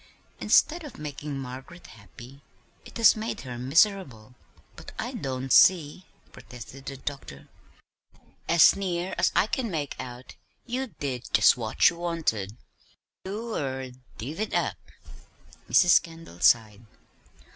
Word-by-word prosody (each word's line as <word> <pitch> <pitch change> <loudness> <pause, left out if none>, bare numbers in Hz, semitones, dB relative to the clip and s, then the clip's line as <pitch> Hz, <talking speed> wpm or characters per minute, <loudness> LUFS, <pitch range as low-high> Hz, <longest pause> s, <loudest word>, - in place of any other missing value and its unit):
"Instead 335 +2 +3
of 295 - -10
making 145 -1 -6
Margaret 135 +6 -9
happy, 120 +7 -14 0.4
it - - -10
has 230 - +6
made 220 +1 -4
her 125 -2 -7
miserable." 135 - +1 0.4
"But - - -12
I - - -4
don't 130 -1 -3
see," 175 -1 +4 0.2
protested 125 +2 -12
the 135 - -6
doctor. 135 - -8 1.0
"As 170 -1 +6
near 185 -2 -3
as - - +3
I - - +4
can 235 +1 -2
make 150 -6 -4
out 125 0 -9 0.3
you 255 +2 -3
did 135 - -6
just 110 -2 +6
what 115 -3 -4
she 180 - +7
wanted; 160 - -3 0.7
you 220 +4 -5
er 130 -2 -4 0.3
'divvied 155 - -4
up.'" - - -2 0.8
Mrs. 180 -2 +6
Kendall 165 - -13
sighed. 110 -1 +3
140 Hz, 125 wpm, -26 LUFS, 125-180 Hz, 1.0 s, she